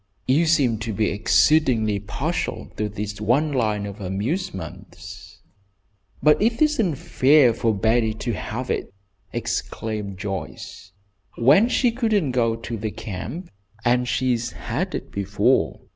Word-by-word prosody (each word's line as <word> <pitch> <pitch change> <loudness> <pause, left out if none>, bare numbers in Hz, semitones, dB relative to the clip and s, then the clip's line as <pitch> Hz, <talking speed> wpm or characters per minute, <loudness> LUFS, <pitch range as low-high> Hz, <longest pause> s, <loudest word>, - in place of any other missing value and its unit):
You 150 +6 +3
seem 135 -9 +2
to 110 0 -4
be 105 +1 0
exceedingly 110 -1 +3
partial 100 +1 -3
to 105 0 -1
this 105 0 -5
one 140 +8 +2
line 110 -6 0
of 100 +1 -8
amusements." 100 - -5 0.8
"It 220 +10 +4
isn't 285 - +2
fair 130 -1 +4
for 115 0 +1
Betty 110 +2 +1
to 120 +1 -3
have 120 +4 -4
it," - - -3 0.4
exclaimed 105 -3 -3
Joyce, 95 -1 -6 0.4
"when 150 - +5
she 250 -1 +2
wouldn't 205 - +2
go 115 -2 +2
to 115 0 -6
the 110 +1 -3
camp, 110 - -7 0.3
and 125 +1 +2
she's 120 -1 0
had - - -3
it - - -6
before! 100 0 +1
115 Hz, 130 wpm, -23 LUFS, 105-145 Hz, 0.8 s, when